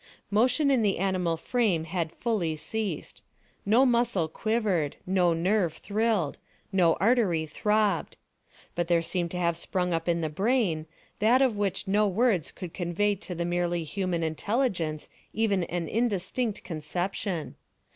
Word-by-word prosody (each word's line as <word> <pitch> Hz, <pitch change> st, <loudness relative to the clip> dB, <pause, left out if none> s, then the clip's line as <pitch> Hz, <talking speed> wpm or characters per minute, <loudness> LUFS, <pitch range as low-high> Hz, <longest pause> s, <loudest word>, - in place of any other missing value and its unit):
Motion 255 Hz, +7 st, +3 dB
in 260 Hz, -4 st, +3 dB
the 205 Hz, -3 st, +1 dB
animal 180 Hz, -3 st, 0 dB
frame 205 Hz, -5 st, +1 dB
had 165 Hz, -1 st, -2 dB
fully 195 Hz, -10 st, -1 dB
ceased. 215 Hz, +6 st, -4 dB, 0.5 s
No 235 Hz, +6 st, +5 dB
muscle 235 Hz, -8 st, +2 dB
quivered; 195 Hz, -5 st, 0 dB
no 180 Hz, -2 st, +3 dB
nerve 180 Hz, 0 st, +1 dB
thrilled; 210 Hz, -7 st, -1 dB, 0.3 s
no 175 Hz, -4 st, +4 dB
artery 195 Hz, -6 st, +2 dB
throbbed. 210 Hz, +3 st, 0 dB, 0.6 s
But 175 Hz, -1 st, -1 dB
there 170 Hz, -1 st, +3 dB
seemed 175 Hz, 0 st, -2 dB
to 180 Hz, -, -5 dB
have 170 Hz, -1 st, +1 dB
sprung 180 Hz, +1 st, -1 dB
up 165 Hz, +1 st, -1 dB
in 170 Hz, 0 st, +1 dB
the 160 Hz, -, 0 dB
brain, 190 Hz, -, 0 dB, 0.3 s
that 240 Hz, +5 st, +5 dB
of 250 Hz, -5 st, +2 dB
which 205 Hz, -1 st, -1 dB
no 210 Hz, +2 st, +3 dB
words 200 Hz, -, +1 dB
could 180 Hz, -4 st, -8 dB
convey 185 Hz, +3 st, 0 dB
to 195 Hz, -2 st, -7 dB
the 170 Hz, 0 st, -2 dB
merely 175 Hz, -1 st, 0 dB
human 175 Hz, +1 st, -2 dB
intelligence 165 Hz, -, -1 dB, 0.3 s
even 205 Hz, -5 st, +1 dB
an 170 Hz, -1 st, -3 dB
indistinct 220 Hz, +1 st, -1 dB
conception. 175 Hz, +2 st, -3 dB
185 Hz, 145 wpm, -28 LUFS, 170-215 Hz, 0.6 s, No